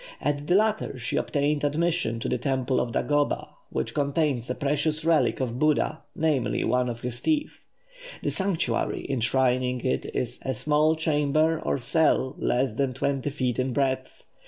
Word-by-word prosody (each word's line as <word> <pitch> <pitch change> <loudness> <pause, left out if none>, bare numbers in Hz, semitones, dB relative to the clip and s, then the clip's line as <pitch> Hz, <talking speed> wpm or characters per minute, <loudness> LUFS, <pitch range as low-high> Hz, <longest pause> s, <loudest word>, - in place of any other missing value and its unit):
At 145 0 -2
the 175 - +3
latter 215 -8 +1
she 120 -1 -3
obtained 145 0 0
admission 155 -5 0
to - - -2
the - - 0
temple 130 0 0
of 120 - -1
Dagoba, 145 0 0 0.2
which 65 - -3
contains 140 -4 0
a 125 - -1
precious 150 +2 -1
relic 165 -2 +3
of 125 -2 -2
Buddha, 155 +1 +1
namely, 155 -6 +1
one 125 0 +1
of 120 0 -5
his 120 -1 -4
teeth. 300 -1 -1 0.6
The - - 0
sanctuary 175 -12 -1
enshrining 125 0 +1
it 130 - -1
is 125 0 -2
a 130 -1 -2
small 150 +5 +2
chamber 155 0 +2
or - - 0
cell, 135 -1 +1
less 125 -1 +1
than 130 +1 -1
twenty 140 +1 -1
feet 130 -4 -1
in 130 0 0
breadth. 130 -1 -1
140 Hz, 160 wpm, -26 LUFS, 125-155 Hz, 0.6 s, the